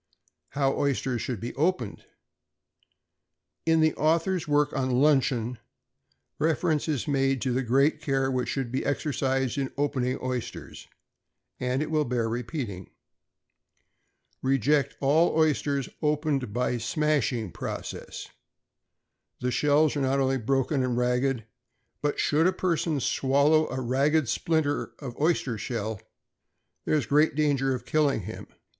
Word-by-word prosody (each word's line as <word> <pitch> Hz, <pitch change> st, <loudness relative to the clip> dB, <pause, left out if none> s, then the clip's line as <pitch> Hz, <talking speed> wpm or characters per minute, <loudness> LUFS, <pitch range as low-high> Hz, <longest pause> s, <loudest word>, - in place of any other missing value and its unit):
=How 135 Hz, -1 st, +1 dB
Oysters 135 Hz, -3 st, 0 dB
should 125 Hz, -5 st, -3 dB
be 120 Hz, +4 st, -5 dB
opened.= 150 Hz, -, -1 dB, 1.6 s
In 160 Hz, 0 st, +4 dB
the 155 Hz, -1 st, +3 dB
author's 165 Hz, +2 st, +1 dB
work 145 Hz, 0 st, +2 dB
on 130 Hz, -1 st, -1 dB
"Luncheon," 130 Hz, -5 st, +2 dB, 0.8 s
reference 160 Hz, -1 st, +1 dB
is 145 Hz, -6 st, -1 dB
made 135 Hz, -2 st, +1 dB
to 130 Hz, -, 0 dB
the 130 Hz, -, +1 dB
great 135 Hz, +5 st, +2 dB
care 135 Hz, -2 st, 0 dB
which 125 Hz, -1 st, -1 dB
should 135 Hz, -4 st, -2 dB
be 130 Hz, -, -1 dB
exercised 135 Hz, -2 st, -1 dB
in 135 Hz, -1 st, -2 dB
opening 130 Hz, -3 st, 0 dB
oysters; 125 Hz, -2 st, -5 dB, 0.7 s
and 130 Hz, +3 st, 0 dB
it 155 Hz, -, -6 dB
will 155 Hz, -1 st, +2 dB
bear 120 Hz, -3 st, -1 dB
repeating. 115 Hz, -, -4 dB, 1.5 s
Reject 135 Hz, +2 st, +2 dB
all 155 Hz, +4 st, +3 dB
oysters 145 Hz, -3 st, +1 dB
opened 150 Hz, -5 st, 0 dB
by 125 Hz, +3 st, 0 dB
the 120 Hz, -, -2 dB
"smashing" 125 Hz, -, 0 dB
process. -, -, -6 dB, 1.1 s
The 125 Hz, 0 st, -1 dB
shells 145 Hz, +4 st, +3 dB
are 145 Hz, -, -1 dB
not 135 Hz, +1 st, +1 dB
only 135 Hz, 0 st, +2 dB
broken 135 Hz, +4 st, 0 dB
and 125 Hz, -2 st, -1 dB
ragged, 125 Hz, -1 st, 0 dB, 0.6 s
but, 145 Hz, 0 st, -1 dB
should 155 Hz, +3 st, +3 dB
a -, -, +4 dB
person 165 Hz, -4 st, 0 dB
swallow 140 Hz, +4 st, +2 dB
a 130 Hz, -, -3 dB
ragged 135 Hz, +4 st, +1 dB
splinter 160 Hz, +2 st, 0 dB
of 125 Hz, -5 st, -7 dB
oyster 140 Hz, -8 st, +1 dB
shell, 110 Hz, -2 st, -4 dB, 0.8 s
there -, -, +2 dB
is 145 Hz, -6 st, +1 dB
great 150 Hz, +5 st, +3 dB
danger 140 Hz, -3 st, +1 dB
of 125 Hz, -, -7 dB
its -, -, -17 dB
killing 145 Hz, -7 st, +2 dB
him. 110 Hz, +4 st, -8 dB
135 Hz, 135 wpm, -27 LUFS, 125-150 Hz, 1.6 s, In